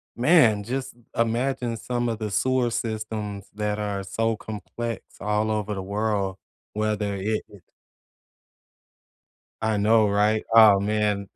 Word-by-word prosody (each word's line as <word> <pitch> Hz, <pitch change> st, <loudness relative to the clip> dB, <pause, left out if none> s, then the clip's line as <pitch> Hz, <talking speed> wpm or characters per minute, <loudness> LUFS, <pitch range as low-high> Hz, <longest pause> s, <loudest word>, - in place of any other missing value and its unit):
man, 120 Hz, -6 st, +4 dB
just 130 Hz, +3 st, -4 dB, 0.2 s
imagine 120 Hz, +1 st, 0 dB
some 120 Hz, +1 st, -2 dB
of 115 Hz, -, -2 dB
the 105 Hz, -2 st, -3 dB
sewer 125 Hz, +3 st, +1 dB
systems 110 Hz, -3 st, -4 dB
that 105 Hz, 0 st, -2 dB
are 100 Hz, -2 st, -2 dB
so 115 Hz, +4 st, -1 dB
complex 110 Hz, +1 st, -6 dB, 0.2 s
all 105 Hz, +2 st, 0 dB
over 105 Hz, -1 st, -1 dB
the 95 Hz, -, -4 dB
world 100 Hz, -1 st, -1 dB, 0.4 s
whether 105 Hz, -1 st, -1 dB
it 105 Hz, +3 st, -2 dB
is 100 Hz, -, -15 dB, 2.0 s
I 110 Hz, -1 st, +1 dB
know, 110 Hz, +1 st, +4 dB
right? 105 Hz, +2 st, +2 dB
Ah, 110 Hz, -3 st, +8 dB
man. 105 Hz, -1 st, 0 dB
110 Hz, 125 wpm, -25 LUFS, 105-115 Hz, 2.0 s, Ah